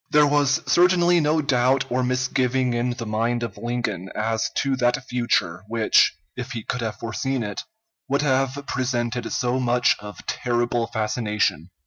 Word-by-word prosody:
There 150 0 +5
was 145 -1 +2
certainly 175 0 +4
no 155 0 +1
doubt 130 0 +2
or 125 +1 +1
misgiving 125 0 0
in 120 +1 0
the 115 - -5
mind 115 +2 -1
of 120 - -5
Lincoln 115 -6 -3
as 110 +1 -1
to 135 -1 +1
that 125 +2 +1
future, 110 -8 0
which, 110 -5 +3 0.2
if 125 +1 -6
he 115 -2 -5
could 125 - -3
have 110 -2 -3
foreseen 130 +2 -2
it, 105 -2 -4 0.5
would 140 +1 +1
have 135 0 0
presented 120 -2 -2
so 125 -1 0
much 125 -1 +3
of 105 0 -10
terrible 120 -1 -1
fascination. 105 - -1
125 Hz, 155 wpm, -23 LUFS, 115-135 Hz, 0.5 s, There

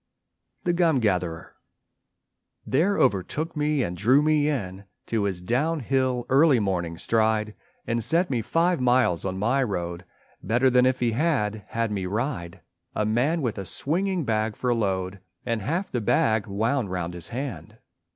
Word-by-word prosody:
THE 175 - +1
GUM 170 -4 +3
GATHERER 90 -6 -1 1.1
There 175 +9 +2
overtook 130 - 0
me 150 -2 +1
and 90 - -3
drew 125 +11 +4
me 150 -1 +2
in 100 -8 -4 0.2
To 110 -3 -1
his 95 -3 -2
down 145 - 0
hill, 130 -1 0
early 140 -1 +5
morning 90 -5 -2
stride, 110 0 +1 0.3
And 115 0 -1
set 170 - +2
me 120 -3 0
five 165 +6 +1
miles 125 -9 +2
on 95 -1 -2
my 120 +8 +1
road 90 -6 -3 0.4
Better 120 +6 +2
than 125 +1 +5
if 130 -1 0
he 120 -1 +2
had 110 - 0
had 115 -1 -2
me 95 -3 -2
ride, 105 - -3 0.3
A 105 - 0
man 135 +9 +1
with 115 -5 -2
a - - -3
swinging 175 - -1
bag 110 -1 0
for 125 -1 0
load 95 -4 -2 0.3
And 115 -3 -1
half 170 - -2
the 120 - -1
bag 110 0 +2
wound 110 +3 0
round 90 -2 -3
his 85 -1 -7
hand. 130 +1 -6
115 Hz, 160 wpm, -25 LUFS, 100-140 Hz, 1.1 s, early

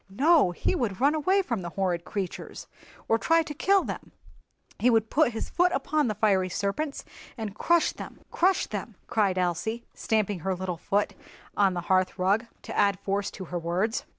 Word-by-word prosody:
"No, 285 - +4
he 175 - -1
would 235 - -2
run 280 +4 +4
away 375 +6 +2
from 235 - -2
the 175 - -5
horrid 180 -2 -1
creatures, 195 -3 -5 0.4
or 225 - +3
try 330 +5 +3
to 300 - -6
kill 385 +6 +3
them; - - -6 0.7
he 250 - +4
would 225 -2 +2
put 295 -5 +3
his 225 - -5
foot 355 +1 +3
upon 300 0 +1
the 215 - -1
fiery 195 -3 +2
serpents 240 - -2 0.3
and 220 -3 -4
crush 340 +9 +2
them—crush 370 +2 -1
them," - - -6
cried 205 -5 +1
Elsie, 185 +6 -1
stamping 210 -4 0
her 190 +3 -1
little 180 -1 -4
foot 200 +4 0 0.4
on 195 -3 +3
the 175 - -2
hearthrug, 190 +4 +1 0.2
to - - -7
add 200 -2 +3
force 200 +1 -1
to 190 - -8
her 175 - 0
words. 180 +7 -1
210 Hz, 180 wpm, -27 LUFS, 185-280 Hz, 0.7 s, No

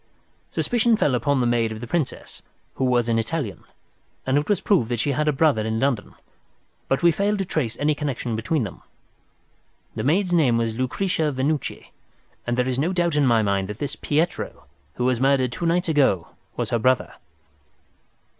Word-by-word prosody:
Suspicion 235 -1 +2
fell 145 - +2
upon 130 +3 +1
the - - +2
maid 120 -2 +1
of 110 - -6
the 120 - -6
Princess, 145 +1 -3 0.3
who 130 - -1
was 120 -2 +2
an 115 -1 +2
Italian, 115 -3 -3 0.6
and 130 - +1
it 145 +5 0
was 205 - +2
proved 165 - +2
that 120 -2 -1
she 145 - +1
had 150 +2 0
a - - +5
brother 145 -5 +2
in 110 +1 -1
London, 125 -5 -1 0.7
but 135 - 0
we 170 - +6
failed 200 +5 0
to 195 - -2
trace 125 -10 -2
any 150 +1 +2
connection 135 -5 -3
between 120 +6 0
them. 100 - -7 1.1
The - - -4
maid's 175 +6 +1
name 140 -9 +4
was 115 -1 0
Lucretia 150 - -1
Venucci, 140 +2 -2 0.6
and 120 0 0
there 125 0 +1
is 130 0 -1
no 170 +6 0
doubt 170 -3 +1
in 145 -2 +3
my 115 -2 +4
mind 100 -2 0
that 105 +1 -6
this 145 - -3
Pietro 155 +4 -2 0.3
who 125 - -1
was 125 -2 +1
murdered 135 -2 +3
two 165 +7 -2
nights 175 +2 +1
ago 140 - +2 0.3
was - - -2
the 120 - +1
brother. 130 +2 +1
135 Hz, 190 wpm, -23 LUFS, 120-160 Hz, 1.1 s, we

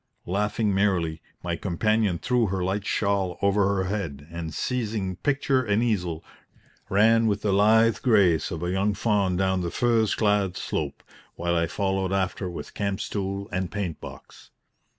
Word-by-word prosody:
Laughing 105 +3 0
merrily, 90 -5 +1 0.2
my 85 -1 -1
companion 100 +2 0
threw 125 +3 +1
her 95 -1 -2
light 95 +2 -2
shawl 100 -3 0
over 100 0 +2
her 95 - 0
head, 90 -8 -4
and, 85 -1 -5
seizing 105 - -2
picture 135 -2 +1
and 105 0 +1
easel, 90 -8 -1 0.7
ran 115 +3 +4
with 105 -1 0
the 105 - +1
lithe 110 +2 +4
grace 100 - +3
of 80 +1 -5
a 90 - -1
young 100 +2 +1
fawn 100 -4 +1
down 95 0 +1
the 85 - -2
furze 115 +1 +2
clad 105 -4 +1
slope, - - -4 0.3
while 85 0 -1
I 85 0 +1
followed 95 -1 -1
after 95 -1 -1
with 85 - -8
camp 100 -1 -2
stool 100 0 -3
and 95 -1 -2
paint 95 -6 -4
box. - - -12
100 Hz, 160 wpm, -25 LUFS, 90-105 Hz, 0.7 s, ran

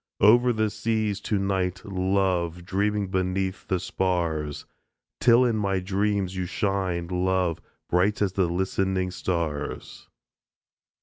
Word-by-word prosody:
Over 120 +4 +6
the 110 -2 0
seas 110 -3 -1
to 105 - +2
night, 95 -1 -1
love, 95 -3 0
Dreaming 100 +1 0
beneath 95 0 -1
the 95 - 0
spars 80 -6 -1 0.5
Till 120 +1 +5
in 115 -3 +1
my 100 -2 0
dreams 100 0 -1
you 90 -1 -2
shine, 95 -3 -1
love, 90 -1 0 0.3
Bright 95 +4 +2
as 100 -3 +1
the 95 -3 +2
listening 95 +1 -1
stars. 85 -5 -3
95 Hz, 120 wpm, -26 LUFS, 90-100 Hz, 0.5 s, Over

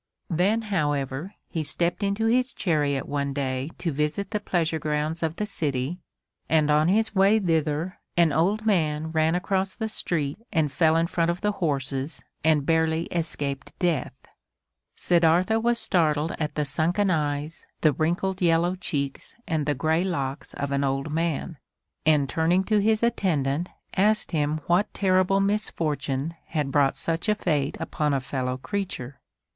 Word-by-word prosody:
Then, 200 +7 +2
however, 150 -3 -2
he 160 - -3
stepped 170 +5 -1
into 200 +2 0
his 250 +2 +2
chariot 145 -6 0
one 140 -1 -2
day 135 0 -2
to 170 - -2
visit 150 +8 -2
the 210 - 0
pleasure 165 -5 0
grounds 155 +2 -1
of 160 -1 -1
the 210 - -2
city, 150 -4 -2 0.5
and 155 -2 +3
on 150 +2 +4
his 220 +4 +2
way 195 +2 +5
thither 165 -2 0 0.2
an 170 -4 +4
old 200 +8 +1
man 160 -6 +1
ran 160 +1 +2
across 190 +1 -1
the 220 - -2
street 165 -6 -2
and 160 -6 +1
fell 160 +3 +3
in 165 0 +3
front 170 0 0
of 170 +1 -2
the 210 - +1
horses 140 -5 -2 0.2
and 155 -2 +3
barely 160 0 +2
escaped 145 -5 -3
death. 170 -8 0 0.8
Siddartha 175 +5 +3
was 235 +1 +2
startled 160 -6 +1
at 150 -1 -2
the 150 - 0
sunken 170 +8 +1
eyes, 150 0 -2
the 155 -2 +4
wrinkled 175 +5 -1
yellow 170 +1 +3
cheeks 140 -7 -4
and 155 -3 -1
the 145 - +1
gray 160 +5 +1
locks 140 -7 -3
of 140 0 -3
an 140 0 +1
old 135 +2 -1
man, 165 0 -2 0.5
and 150 -3 +4
turning 165 +7 +2
to 210 +2 +2
his 220 +2 +2
attendant 170 - 0 0.3
asked 210 +3 +2
him 155 -1 0
what 175 +4 +2
terrible 185 0 +3
misfortune 165 -8 -1
had 150 -4 -2
brought 140 -1 +3
such 165 +5 -1
a 210 - +4
fate 150 -8 -1
upon 150 -2 -1
a - - +1
fellow 130 -1 -3
creature. 145 - -4
160 Hz, 160 wpm, -25 LUFS, 145-185 Hz, 0.8 s, way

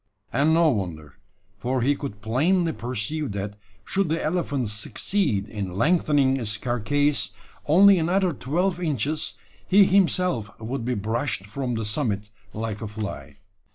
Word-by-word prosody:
And 145 +3 +3
no 165 -1 +5
wonder: 85 - -4 0.4
for 125 +2 -1
he 145 +3 +3
could 120 -8 -7
plainly 165 - +2
perceive 130 +2 -3
that 100 +1 -4 0.3
should 195 -3 0
the 165 +1 0
elephant 150 - -1
succeed 105 - -1
in 95 -4 -5
lengthening 145 - +3
its 110 -4 -2
carcase 140 +6 0 0.3
only 190 +5 +7
another 180 +2 +1
twelve 175 +8 -1
inches, 155 - -1 0.3
he 200 +2 +7
himself 180 - +1
would 115 +3 -4
be 125 +1 -1
brushed 110 +1 -2
from 125 +4 -3
the 110 -1 -2
summit 105 -3 -1 0.2
like 110 -1 -4
a 110 - -3
fly. 105 -1 -6
130 Hz, 140 wpm, -25 LUFS, 105-160 Hz, 0.4 s, only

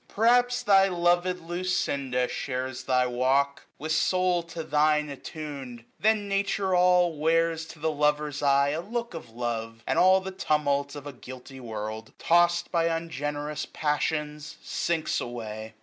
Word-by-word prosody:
Perhaps 245 +3 +3
thy 195 -1 +5
lov'd 175 0 +1
Lucinda 145 -7 -1
shares 130 0 -4
thy 125 -1 +3
walk. 130 +3 +1
With 155 +2 -4
soul 180 +1 +2
to 165 -1 -7
thine 150 0 +2
attunM. 140 -5 -8
Then 215 -1 +2
Nature 195 -1 0
all 180 -2 +4
Wears 165 +1 +1
to - - -11
the 160 +1 -1
lover's 150 -1 0
eye 140 0 +4
a 155 +3 -2
look 235 +4 -4
of 160 -8 -8
love; 115 -1 -4
g^S 115 - -25
And - - +1
all 185 +1 +6
the 190 0 -6
tumult 145 -5 0
of 145 -1 -8
a 145 - -7
guilty 130 +1 -11
world. 110 -2 -6
Tost 175 +1 +3
by 170 -2 +2
ungenerous 150 -3 -3
passions, 150 0 -2
sinks 165 -2 -1
away. 110 -2 -6
150 Hz, 150 wpm, -27 LUFS, 135-175 Hz, -, all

